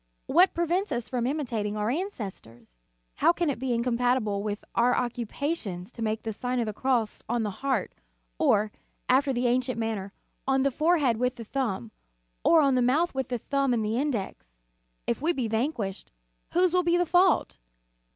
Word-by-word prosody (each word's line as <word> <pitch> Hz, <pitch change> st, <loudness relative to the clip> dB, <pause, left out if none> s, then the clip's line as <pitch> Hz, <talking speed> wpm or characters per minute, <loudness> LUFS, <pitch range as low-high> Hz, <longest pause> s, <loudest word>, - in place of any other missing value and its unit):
What 360 Hz, +5 st, +4 dB
prevents 345 Hz, +2 st, 0 dB
us 240 Hz, -3 st, -2 dB
from 245 Hz, -2 st, -1 dB
imitating 230 Hz, -8 st, -2 dB
our 210 Hz, +2 st, 0 dB
ancestors? 195 Hz, -, -6 dB, 0.4 s
How -, -, +5 dB
can 340 Hz, -3 st, 0 dB
it 260 Hz, -, -6 dB
be 260 Hz, 0 st, -2 dB
incompatible 235 Hz, -3 st, +1 dB
with 205 Hz, 0 st, -4 dB
our 245 Hz, +1 st, +3 dB
occupations 240 Hz, -, -3 dB
to 235 Hz, -, -10 dB
make 220 Hz, 0 st, -1 dB
the 220 Hz, -, -3 dB
Sign 250 Hz, +3 st, -2 dB
of 235 Hz, -, +1 dB
the 215 Hz, -, -3 dB
Cross 240 Hz, -2 st, 0 dB
on 240 Hz, -1 st, +1 dB
the 210 Hz, -, -2 dB
heart, 265 Hz, -8 st, 0 dB, 0.5 s
or, 210 Hz, +1 st, +3 dB, 0.4 s
after 270 Hz, +2 st, +3 dB
the 250 Hz, -1 st, -1 dB
ancient 250 Hz, +1 st, +1 dB
manner, 220 Hz, -4 st, -3 dB, 0.4 s
on 270 Hz, 0 st, +3 dB
the 275 Hz, -, +2 dB
forehead 305 Hz, -4 st, +2 dB
with 250 Hz, +2 st, 0 dB
the 230 Hz, -, -8 dB
thumb, 210 Hz, -, -2 dB, 0.5 s
or 330 Hz, -1 st, +6 dB
on 275 Hz, -2 st, +3 dB
the 255 Hz, -, +3 dB
mouth 290 Hz, +8 st, +2 dB
with 265 Hz, -2 st, -2 dB
the 250 Hz, -2 st, -2 dB
thumb 275 Hz, +1 st, 0 dB
and 220 Hz, -2 st, 0 dB
the 220 Hz, +3 st, 0 dB
index? 235 Hz, -, -3 dB, 0.6 s
If -, -, -1 dB
we 335 Hz, +3 st, +2 dB
be 255 Hz, -7 st, -1 dB
vanquished, 220 Hz, -4 st, -2 dB, 0.4 s
whose 360 Hz, 0 st, +3 dB
will 365 Hz, -, +4 dB
be 345 Hz, 0 st, +2 dB
the 355 Hz, -, +2 dB
fault? 355 Hz, -, +3 dB
245 Hz, 180 wpm, -27 LUFS, 220-285 Hz, 0.6 s, or